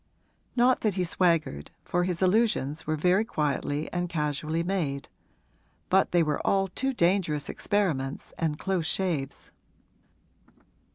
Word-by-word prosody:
Not 250 Hz, +1 st, +4 dB
that 210 Hz, -4 st, +1 dB
he 185 Hz, -, +1 dB
swaggered, 165 Hz, -, +1 dB, 0.2 s
for 175 Hz, 0 st, +1 dB
his 180 Hz, 0 st, -1 dB
allusions 185 Hz, -, +1 dB
were 155 Hz, -, +1 dB
very 180 Hz, +6 st, +3 dB
quietly 150 Hz, -, -1 dB
and 175 Hz, 0 st, -1 dB
casually 155 Hz, +1 st, -1 dB
made; 155 Hz, -8 st, -2 dB, 0.8 s
but 190 Hz, +1 st, +4 dB
they 175 Hz, -1 st, +4 dB
were 150 Hz, -2 st, -1 dB
all 195 Hz, -1 st, +1 dB
too 265 Hz, +9 st, -1 dB
dangerous 170 Hz, -, +1 dB
experiments 150 Hz, -10 st, -1 dB
and 155 Hz, -3 st, -1 dB
close 180 Hz, -2 st, -1 dB
shaves. 175 Hz, -7 st, -2 dB
175 Hz, 125 wpm, -27 LUFS, 150-190 Hz, 0.8 s, Not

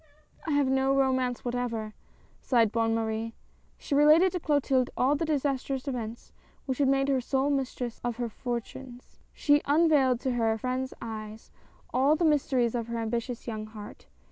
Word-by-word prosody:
"I 310 Hz, -, 0 dB
have 285 Hz, -1 st, +3 dB
no 265 Hz, +1 st, +2 dB
romance 260 Hz, -2 st, 0 dB
whatever!" 235 Hz, -3 st, -3 dB, 0.5 s
sighed 230 Hz, -5 st, +2 dB
Bonne 225 Hz, 0 st, +1 dB
Marie. 225 Hz, 0 st, -2 dB, 0.4 s
She -, -, -5 dB
related 305 Hz, +6 st, +6 dB
to 360 Hz, -, -3 dB
Clotilde 280 Hz, -5 st, +1 dB
all 265 Hz, +3 st, +3 dB
the 330 Hz, -, -1 dB
disastrous 275 Hz, -3 st, -1 dB
events 235 Hz, -3 st, -5 dB, 0.3 s
which 260 Hz, -1 st, -3 dB
had 280 Hz, -, +3 dB
made 270 Hz, 0 st, +2 dB
her 270 Hz, -2 st, +1 dB
sole 270 Hz, +3 st, 0 dB
mistress 255 Hz, -3 st, -3 dB
of 240 Hz, -1 st, -2 dB
her 240 Hz, -1 st, -2 dB
fortunes. 245 Hz, +2 st, -7 dB
She 290 Hz, 0 st, +3 dB
unvailed 290 Hz, -5 st, +3 dB
to 260 Hz, -, -1 dB
her 225 Hz, -2 st, +1 dB
friend's 255 Hz, +3 st, -3 dB
eyes 215 Hz, -1 st, -8 dB, 0.4 s
all 270 Hz, +4 st, +4 dB
the 335 Hz, -, 0 dB
mysteries 265 Hz, -6 st, +2 dB
of 235 Hz, -2 st, -2 dB
her 235 Hz, 0 st, -4 dB
ambitious 235 Hz, +1 st, -3 dB
young 215 Hz, -2 st, -5 dB
heart. 215 Hz, -1 st, -11 dB
255 Hz, 165 wpm, -28 LUFS, 230-275 Hz, 0.5 s, related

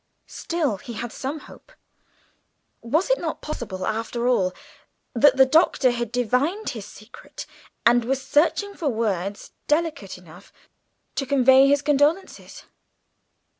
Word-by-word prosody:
Still 305 Hz, -, -2 dB
he 235 Hz, +5 st, -9 dB
had 235 Hz, +1 st, -6 dB
some 285 Hz, +6 st, -5 dB
hope. -, -, -16 dB, 1.1 s
Was 315 Hz, -, 0 dB
it -, -, +2 dB
not 325 Hz, -2 st, -4 dB
possible, 205 Hz, -11 st, -5 dB
after 230 Hz, +2 st, -2 dB
all, 190 Hz, -7 st, +2 dB, 0.6 s
that 265 Hz, +3 st, +4 dB
the 265 Hz, -, +7 dB
Doctor 265 Hz, -2 st, +3 dB
had 240 Hz, -2 st, -4 dB
divined 250 Hz, -, 0 dB
his 220 Hz, -4 st, -7 dB
secret 215 Hz, +3 st, -12 dB, 0.4 s
and 240 Hz, 0 st, +5 dB
was 265 Hz, +3 st, -1 dB
searching 320 Hz, +9 st, +1 dB
for 325 Hz, -7 st, -2 dB
words 200 Hz, -4 st, -3 dB, 0.2 s
delicate 300 Hz, -, -1 dB
enough 180 Hz, +1 st, -16 dB, 0.6 s
to 275 Hz, -, -3 dB
convey 265 Hz, 0 st, +5 dB
his 285 Hz, 0 st, +2 dB
condolences? 295 Hz, +6 st, 0 dB
260 Hz, 130 wpm, -23 LUFS, 225-300 Hz, 1.1 s, the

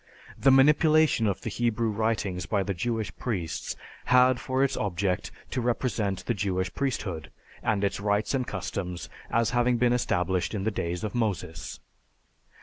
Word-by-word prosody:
The 135 Hz, -, +3 dB
manipulation 150 Hz, -1 st, +5 dB
of 100 Hz, -, -1 dB
the -, -, -4 dB
Hebrew 115 Hz, -1 st, 0 dB
writings 105 Hz, -4 st, -1 dB
by 100 Hz, -3 st, +1 dB
the 100 Hz, -, -2 dB
Jewish 110 Hz, +4 st, -2 dB
priests 90 Hz, -10 st, -3 dB, 0.3 s
had 125 Hz, 0 st, +5 dB
for 130 Hz, +1 st, 0 dB
its 140 Hz, -, +1 dB
object 95 Hz, -2 st, -1 dB, 0.2 s
to 130 Hz, -, -1 dB
represent 115 Hz, -5 st, -1 dB
the 120 Hz, -, +1 dB
Jewish 95 Hz, -3 st, -1 dB
priesthood, 95 Hz, -, -2 dB, 0.3 s
and 100 Hz, -1 st, 0 dB
its 100 Hz, -, 0 dB
rights 105 Hz, +3 st, 0 dB
and 130 Hz, -2 st, 0 dB
customs, 90 Hz, -2 st, -4 dB, 0.2 s
as 115 Hz, -1 st, +2 dB
having 120 Hz, 0 st, +2 dB
been 120 Hz, +1 st, +3 dB
established 95 Hz, -5 st, 0 dB
in 95 Hz, -, -2 dB
the 110 Hz, -, +1 dB
days 85 Hz, -3 st, -3 dB
of 105 Hz, -, -3 dB
Moses. 95 Hz, -, -2 dB
110 Hz, 155 wpm, -27 LUFS, 95-125 Hz, 0.3 s, manipulation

